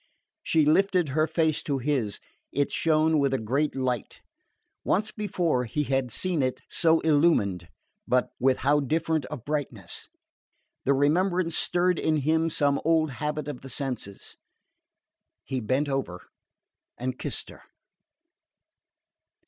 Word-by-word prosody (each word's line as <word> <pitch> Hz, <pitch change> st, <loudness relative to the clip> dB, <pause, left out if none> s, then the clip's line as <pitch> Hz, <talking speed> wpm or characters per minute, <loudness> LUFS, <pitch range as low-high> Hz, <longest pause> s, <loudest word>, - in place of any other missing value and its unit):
She 160 Hz, -2 st, +2 dB
lifted 180 Hz, +1 st, +3 dB
her 155 Hz, +4 st, +1 dB
face 160 Hz, -1 st, +1 dB
to 140 Hz, -2 st, -1 dB
his. 130 Hz, -6 st, -1 dB, 0.3 s
It 145 Hz, 0 st, 0 dB
shone 155 Hz, -1 st, +2 dB
with 140 Hz, -1 st, +2 dB
a -, -, +1 dB
great 135 Hz, +7 st, -1 dB
light. 125 Hz, -4 st, -2 dB, 0.6 s
Once 215 Hz, +2 st, +1 dB
before 175 Hz, -, -1 dB
he 150 Hz, +6 st, -1 dB
had 135 Hz, -2 st, 0 dB
seen 175 Hz, +4 st, -1 dB
it 130 Hz, -1 st, -1 dB
so 165 Hz, -1 st, +3 dB
illumined, 145 Hz, -, +2 dB, 0.4 s
but 125 Hz, 0 st, +1 dB
with 130 Hz, 0 st, +3 dB
how 145 Hz, +1 st, +4 dB
different 160 Hz, +1 st, 0 dB
a 150 Hz, -, -4 dB
brightness! 125 Hz, -, -5 dB, 0.8 s
The 140 Hz, -, +3 dB
remembrance 170 Hz, +4 st, +2 dB
stirred 180 Hz, 0 st, +2 dB
in 155 Hz, -1 st, +1 dB
him 160 Hz, +3 st, +1 dB
some 140 Hz, -2 st, +1 dB
old 160 Hz, -2 st, +2 dB
habit 150 Hz, +2 st, -3 dB
of 145 Hz, -4 st, -6 dB
the 135 Hz, -, -9 dB
senses. 125 Hz, -7 st, -5 dB, 1.1 s
He 130 Hz, -1 st, -3 dB
bent 130 Hz, +7 st, 0 dB
over 135 Hz, -11 st, -3 dB, 0.7 s
and 130 Hz, +1 st, -4 dB
kissed -, -, -3 dB
her. -, -, -13 dB
145 Hz, 130 wpm, -27 LUFS, 130-160 Hz, 1.1 s, how